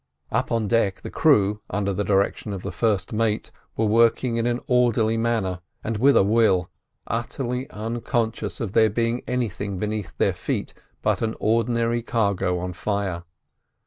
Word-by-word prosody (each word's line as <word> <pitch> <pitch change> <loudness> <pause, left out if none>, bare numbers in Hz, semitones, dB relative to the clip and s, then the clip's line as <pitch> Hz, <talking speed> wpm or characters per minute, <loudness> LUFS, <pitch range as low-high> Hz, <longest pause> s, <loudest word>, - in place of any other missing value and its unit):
Up - - 0
on 115 -2 +1
deck 105 -4 +1
the - - -7
crew, 105 -9 +3
under 100 0 -1
the 105 - -1
direction 100 +1 0
of 95 - -6
the - - -4
first 105 -5 0
mate, 110 -1 0 0.3
were 110 - +2
working 115 +2 +3
in 115 +1 +1
an 120 0 0
orderly 120 -3 +2
manner, 110 -6 0 0.2
and 110 -1 -2
with 135 +5 +5
a - - +6
will, 100 -4 +3 0.3
utterly 125 +3 -3
unconscious 110 -1 -2
of 105 -4 -3
there 110 -1 +5
being 115 +3 0
anything 105 -5 -2
beneath 105 -5 -4
their - - +2
feet - - -3 0.3
but - - +1
an 110 -1 -1
ordinary 115 +1 +1
cargo 100 -6 0
on 90 +1 -4
fire. 95 -3 -2
110 Hz, 160 wpm, -24 LUFS, 100-115 Hz, 0.3 s, a